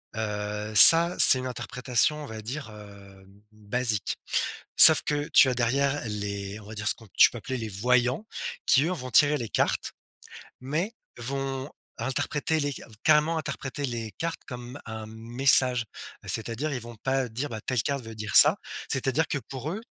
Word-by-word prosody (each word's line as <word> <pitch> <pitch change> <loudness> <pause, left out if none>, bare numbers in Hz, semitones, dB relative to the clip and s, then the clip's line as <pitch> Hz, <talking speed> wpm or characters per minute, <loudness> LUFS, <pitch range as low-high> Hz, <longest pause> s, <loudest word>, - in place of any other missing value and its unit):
heu, 105 0 -5
ça, 165 - +10
c'est 130 - +8
une 130 - -6
interprétation 125 +4 -2
on - - -9
va 110 -2 -9
dire, 125 +2 -7
heu, 100 -2 -15 0.3
basique. 110 0 -1 0.6
Sauf - - +8
que 150 +1 -3
tu 135 - +6
as 130 - -1
derrière 135 +4 -1
les 100 -1 -6
on 100 - -16
va 110 - -10
dire 105 0 -7
ce - - +1
qu'on 110 - -19
tu - - +6
peux 120 - -9
appeler 130 +4 -6
les 110 -2 -6
voyants 125 - -1 0.4
qui 135 - +3
eux, 175 - -2
vont 130 -7 -7
tirer 145 +5 +3
les 120 -6 -6
cartes, - - -2 0.7
mais 155 - -4 0.3
vont 135 +2 -5 0.3
interpréter 140 +5 -3
les 145 -1 -3
ca - - -11 0.2
carrément 155 +1 +2
interpréter 140 -2 -6
les 115 -4 -5
cartes 165 0 -5
comme 125 +2 -10
un 110 -1 -8
message. 120 +2 +2 0.4
Heu, - - -13
c'est-à-dire, 115 +7 -2
ils 130 - -4
vont 120 0 -11
pas 135 +2 -3
dire: 125 +6 -5
«Bah, 110 -2 -7
telle 125 0 -2
carte 140 +3 -4
veut 110 0 -11
dire 110 -2 -7
ça», - - +8 0.3
c'est-à-dire 135 +4 -1
que 145 - -3
pour 135 +4 -8
eux 205 - -6
125 Hz, 180 wpm, -25 LUFS, 110-140 Hz, 0.7 s, ça